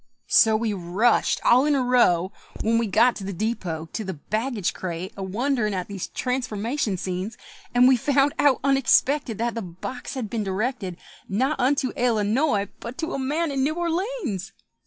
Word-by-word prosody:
So 220 -3 +5
we 220 -1 -1
rushed 195 +6 +1
all 250 +2 +6
in 295 -1 +3
a 265 - +1
row, 190 -8 +3 0.3
When 230 +1 +2
we 230 - 0
got 230 +5 +4
to 200 - -7
the 195 -1 -5
depôt, 170 -6 -3
To 220 - -4
the 190 -3 -5
baggage 215 - -2
crate, 185 +3 -5
a 195 - -7
wonderin' 215 +2 -1
at 180 -1 -3
these 200 -3 -5
transformation 250 -3 -2
scenes; 185 +3 -4 0.4
And 250 +1 +7
we 260 - +6
found 280 +3 +2
out 280 -3 +4
unexpected 270 -2 +2
That 235 +1 -1
the 230 - -3
box 190 +10 -7
had 250 -5 -3
been 220 +1 -2
directed 195 -1 -2 0.3
Not 265 +9 0
unto 260 0 +1
Ellanoy, 220 -1 +1
but 235 +2 -7
to 325 +1 -3
a - - -2
man 300 +4 -1
in 270 -1 -1
New 305 +3 0
Or 345 0 -1
leéns! 325 - -3
230 Hz, 180 wpm, -24 LUFS, 195-265 Hz, 0.4 s, And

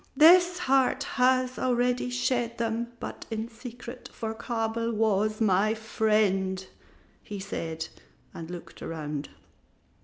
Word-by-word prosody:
"This 350 +3 +7
heart 270 -4 +2
has 255 -1 +2
already 250 0 +1
shed 245 -1 0
them, 235 +1 -2
but - - -7
in 220 0 -3
secret, 240 +1 -9
for 220 -1 -4
Kabel 230 0 -2
was 215 -1 +1
my 215 0 +3
friend," 210 -4 +1 0.6
he 205 -1 -7
said, 160 -5 -4 0.5
and 165 0 -7
looked 175 -1 -9
around. 150 -3 -4
225 Hz, 115 wpm, -28 LUFS, 205-250 Hz, 0.6 s, This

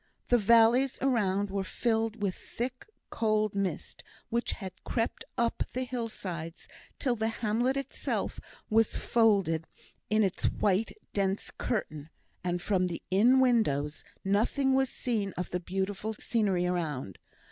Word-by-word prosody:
The 245 - +5
valleys 235 +5 +5
around 205 -7 +1
were 195 0 -1
filled 225 +1 -1
with 195 -2 +1
thick 250 +6 -6 0.2
cold 215 -2 +1
mist, 200 -2 -3 0.3
which 235 0 0
had 190 -3 -8
crept 230 -1 -1
up 235 -1 0
the 255 - -1
hillsides 195 -9 -5 0.3
till 250 -3 +1
the 220 -1 0
hamlet 230 +4 0
itself 275 - -2 0.3
was 225 0 +3
folded 195 -9 +2 0.4
in 215 0 +4
its 190 -3 -1
white 205 - +1 0.2
dense 195 0 0
curtain, 155 - -3 0.3
and 175 0 -1
from 185 -3 +2
the 170 -2 -5
inn 235 +8 +5
windows 160 - +2 0.2
nothing 235 +7 +2
was 265 -1 +3
seen 215 -6 -2
of 180 - -3
the 180 - -1
beautiful 195 +4 -2
scenery 200 -6 +1
around. 155 - -2
215 Hz, 135 wpm, -30 LUFS, 185-235 Hz, 0.4 s, The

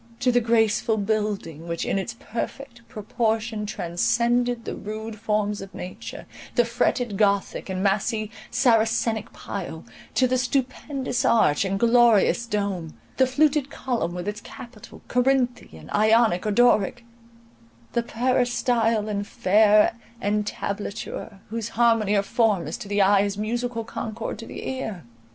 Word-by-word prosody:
—to 250 0 +3
the 245 0 +3
graceful 225 -1 +2
building, 205 -6 -2
which 170 0 -3
in 195 - 0
its 225 +4 -5
perfect 240 +2 -6
proportion 220 0 -2
transcended 230 +6 0
the - - -4
rude 220 +1 -6
forms 210 -1 -1
of 195 -1 -10
nature, 150 - -8 0.3
the 240 - +4
fretted 235 -2 0
gothic 200 -1 +1
and 190 0 -2
massy 215 +2 0 0.2
saracenic 225 -1 +2
pile, - - -6 0.3
to 255 - +4
the 255 0 +1
stupendous 260 0 -1
arch 220 - +3
and 195 0 -1
glorious 235 0 +4
dome, 200 -7 -3 0.2
the 260 - +4
fluted 285 +1 +2
column 240 -11 -2
with 180 +2 -5
its 210 0 -4
capital, 230 -3 -12
Corinthian, 245 - 0
Ionic, 215 -3 +3
or - - +1
Doric, 240 +1 +3 0.9
the 235 - +2
peristyle 235 -2 +1
and 205 -1 -3
fair 210 +3 +4 0.2
entablature, 210 0 -3
whose 230 0 -3
harmony 225 -3 +3
of 200 -1 +2
form 215 -7 +2
is - - -4
to - - -8
the 205 0 +2
eye 195 0 +5
as 200 0 -1
musical 235 +2 -2
concord 220 -1 -5
to 230 - -8
the - - -7
ear! 220 -9 -4
220 Hz, 135 wpm, -24 LUFS, 205-240 Hz, 0.9 s, eye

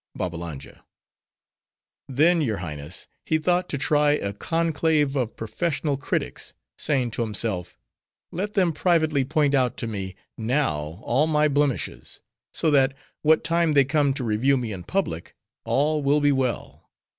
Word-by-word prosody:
BABBALANJA—Then, 90 - -4
your 115 -8 0
Highness, 75 -2 -6 0.2
he 160 - +1
thought 175 +3 +1
to 140 - -2
try 145 +1 +3
a 100 -8 -2
conclave 160 +1 +1
of 125 -4 -1
professional 145 +6 -1
critics; 140 - -3 0.2
saying 130 -5 0
to 115 - -3
himself, 105 -5 -2 0.5
"Let 205 +4 -4
them 180 -5 +3
privately 160 -4 +2
point 145 +1 +1
out 130 -3 +2
to - - -3
me, 95 -4 -4 0.2
now, 90 - -1
all 135 +6 +2
my 150 -1 +3
blemishes; 145 - -1 0.3
so 160 - +1
that, 135 -1 +3 0.3
what 155 +1 +4
time 170 -1 +2
they 140 -2 +5
come 145 0 +2
to 135 - -3
review 120 +5 +2
me 120 -3 -3
in 90 -3 -7
public, 175 - -2 0.3
all 150 +2 +1
will 145 +1 +3
be 145 0 +3
well." 130 -4 -2
140 Hz, 145 wpm, -24 LUFS, 110-155 Hz, 0.5 s, they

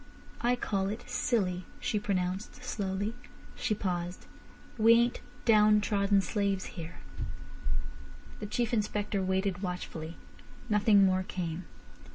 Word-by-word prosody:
"I 245 +1 +3
call 195 -5 0
it 215 +3 -5
silly," 185 -7 +1 0.2
she 210 - 0
pronounced 190 -1 -2
slowly. 200 +1 -2 0.4
She 215 - 0
paused. 180 -2 -3 0.5
"We 225 +1 +8
ain't 235 +1 +3 0.2
downtrodden 210 -2 +5
slaves 200 -1 0
here." 165 -2 -7 1.4
The 210 - -4
Chief 235 +2 0
Inspector 210 -2 0
waited 190 0 0
watchfully. 170 -3 -4 0.5
Nothing 205 -1 +6
more 185 0 +3
came. 180 -2 -4
200 Hz, 110 wpm, -31 LUFS, 185-215 Hz, 1.4 s, We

